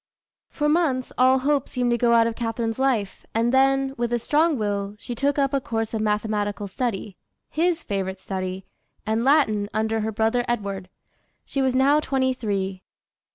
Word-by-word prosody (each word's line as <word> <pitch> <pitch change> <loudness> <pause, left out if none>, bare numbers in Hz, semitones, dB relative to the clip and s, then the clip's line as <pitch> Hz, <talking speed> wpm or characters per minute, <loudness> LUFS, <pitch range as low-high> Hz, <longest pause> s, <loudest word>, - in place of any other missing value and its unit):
For 295 - -1
months 300 -5 +1
all 255 +1 +5
hope 275 +1 0
seemed 245 -1 0
to 240 - +2
go 235 0 +3
out 230 -1 +5
of 230 0 -1
Catharine's 225 0 -2
life, 235 -8 0
and 230 +2 +2
then, 270 0 +3
with 240 0 -1
a 240 - +2
strong 300 +5 +2
will, 205 -2 -2
she 240 - -6
took 280 +4 0
up 275 -1 +1
a 275 - +1
course 225 -2 -3
of 220 - -1
mathematical 210 -1 -1
study, 210 -3 -3 0.3
his 335 +1 +1
favorite 190 -1 -3
study, 185 0 -4 0.4
and 220 +2 0
Latin 230 -8 +3
under 220 +1 0
her 220 +1 -1
brother 225 +3 +1
Edward. 200 -5 -3 0.6
She 275 - -2
was 260 -1 +1
now 280 +3 +4
twenty 265 -3 0
three. 195 -5 -3
235 Hz, 175 wpm, -24 LUFS, 210-265 Hz, 0.6 s, all